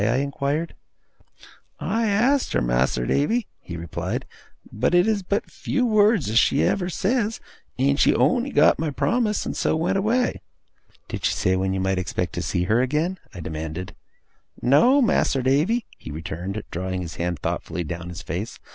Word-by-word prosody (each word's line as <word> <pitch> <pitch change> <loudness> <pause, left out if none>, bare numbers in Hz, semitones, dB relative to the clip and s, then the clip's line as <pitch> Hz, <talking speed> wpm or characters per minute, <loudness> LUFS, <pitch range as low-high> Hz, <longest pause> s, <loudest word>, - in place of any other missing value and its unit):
I 115 +4 +2
inquired. 140 +3 -1 1.1
'I 225 0 0
asked 250 +7 +2
her, - - +3
Mas'r - - +1
Davy,' 215 - +1
he 85 - -8
replied, 85 -1 -4 0.5
'but 115 +11 +1
it 175 +3 +5
is 215 -2 +1
but 200 +2 -2
few 255 - -1
words 215 - +3
as 110 +2 +4
she 140 - +3
ever 180 -2 +1
says, 215 +4 0 0.4
and 140 +2 +2
she - - +4
on'y 255 +2 +2
got - - +4
my 160 -1 0
promise 215 - 0
and - - -3
so - - +1
went 170 +4 +1
away.' 235 +5 +1 0.7
'Did - - -4
she - - +2
say 95 - +1
when 95 0 0
you - - -1
might 95 0 0
expect 90 - -2
to - - -3
see 90 - -1
her 110 +6 +2
again?' 155 +8 0 0.2
I 90 - -6
demanded. 80 +3 -5 0.7
'No, 245 - +5
Mas'r 135 - +2
Davy,' 160 - +2
he - - -9
returned, 85 +6 -5
drawing 95 +1 -3
his 80 - -8
hand 85 0 -1
thoughtfully 85 - -3
down 85 +2 -6
his 90 +1 -8
face. 95 +8 -4
140 Hz, 175 wpm, -23 LUFS, -, 1.1 s, it